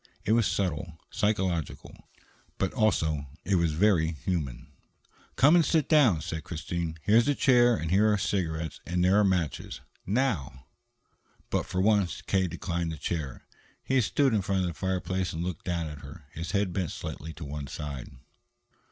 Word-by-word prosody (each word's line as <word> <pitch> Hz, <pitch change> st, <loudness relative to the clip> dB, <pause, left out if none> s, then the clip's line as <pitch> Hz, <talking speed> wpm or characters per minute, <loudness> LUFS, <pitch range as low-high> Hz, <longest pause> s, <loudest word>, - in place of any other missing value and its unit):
It 105 Hz, -, +1 dB
was 115 Hz, -2 st, +4 dB
subtle, 85 Hz, -4 st, -2 dB
psychological, 95 Hz, -7 st, -2 dB, 0.5 s
but 95 Hz, -, -1 dB
also 80 Hz, -, +1 dB, 0.2 s
it 100 Hz, -, 0 dB
was 85 Hz, -3 st, +1 dB
very 85 Hz, -2 st, +3 dB
human. 75 Hz, -6 st, -4 dB, 0.6 s
"Come 150 Hz, +6 st, +6 dB
and 170 Hz, -, +6 dB
sit 155 Hz, -1 st, +2 dB
down," 130 Hz, -, +4 dB
said 80 Hz, -1 st, -5 dB
Christine. 85 Hz, 0 st, -4 dB
"Here's 115 Hz, +5 st, +4 dB
a 145 Hz, -, +2 dB
chair, 120 Hz, -3 st, +5 dB
and 80 Hz, -5 st, -3 dB
here 105 Hz, +3 st, +4 dB
are 105 Hz, -, +2 dB
cigarettes 80 Hz, -6 st, -2 dB
and 90 Hz, +1 st, 0 dB
there 95 Hz, +3 st, +5 dB
are -, -, +4 dB
matches. 90 Hz, -5 st, -1 dB, 0.3 s
Now!" 95 Hz, -, -1 dB, 0.9 s
But, -, -, 0 dB
for 95 Hz, -, -1 dB
once, 100 Hz, -4 st, +2 dB
K. 95 Hz, -1 st, +1 dB
declined 85 Hz, -1 st, -3 dB
the 80 Hz, -, -6 dB
chair. 75 Hz, -3 st, -4 dB, 0.4 s
He 130 Hz, -1 st, +2 dB
stood 135 Hz, +3 st, +2 dB
in 105 Hz, -, +2 dB
front 95 Hz, 0 st, 0 dB
of 90 Hz, -, 0 dB
the -, -, -5 dB
fireplace 95 Hz, +1 st, -2 dB
and 80 Hz, +1 st, -3 dB
looked 90 Hz, -3 st, -5 dB
down 85 Hz, -2 st, -1 dB
at 75 Hz, -2 st, -7 dB
her, 75 Hz, +2 st, -11 dB
his 85 Hz, +2 st, -5 dB
head 100 Hz, -3 st, 0 dB
bent 90 Hz, -4 st, -1 dB
slightly 80 Hz, +2 st, -6 dB
to 80 Hz, 0 st, -8 dB
one 70 Hz, 0 st, -5 dB
side. 70 Hz, -2 st, -6 dB
90 Hz, 170 wpm, -28 LUFS, 80-105 Hz, 0.9 s, Come